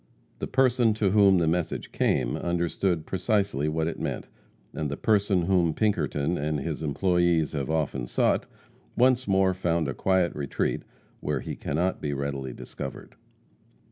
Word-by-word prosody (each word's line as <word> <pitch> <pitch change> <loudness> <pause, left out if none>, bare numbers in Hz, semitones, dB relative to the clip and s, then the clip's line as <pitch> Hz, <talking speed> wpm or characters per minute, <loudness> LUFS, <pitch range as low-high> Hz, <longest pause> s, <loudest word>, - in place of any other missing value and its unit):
The - - -3
person 125 -4 +3
to 105 -3 +1
whom 100 -2 +6
the 85 - +2
message 85 0 -1
came - - +1
understood 85 -1 -1
precisely 95 - 0
what 80 +1 0
it 85 - -3
meant, - - -4 0.4
and 75 -2 -3
the 70 - -4
person 100 -4 +2
whom 85 -3 +2
Pinkerton 90 -6 0
and 75 0 -1
his 80 +2 -4
employees 85 0 +2
have 70 -3 -3
often 75 -6 -1
sought, - - +1 0.5
once 130 0 +3
more 95 -1 +3
found 85 -4 0
a 70 - -2
quiet 95 +4 +1
retreat, 70 -2 -1 0.4
where - - -2
he - - -5
cannot 90 +6 -1
be 75 -1 -2
readily 70 -1 -3
discovered. 65 +2 -8
85 Hz, 150 wpm, -27 LUFS, 75-95 Hz, 0.5 s, whom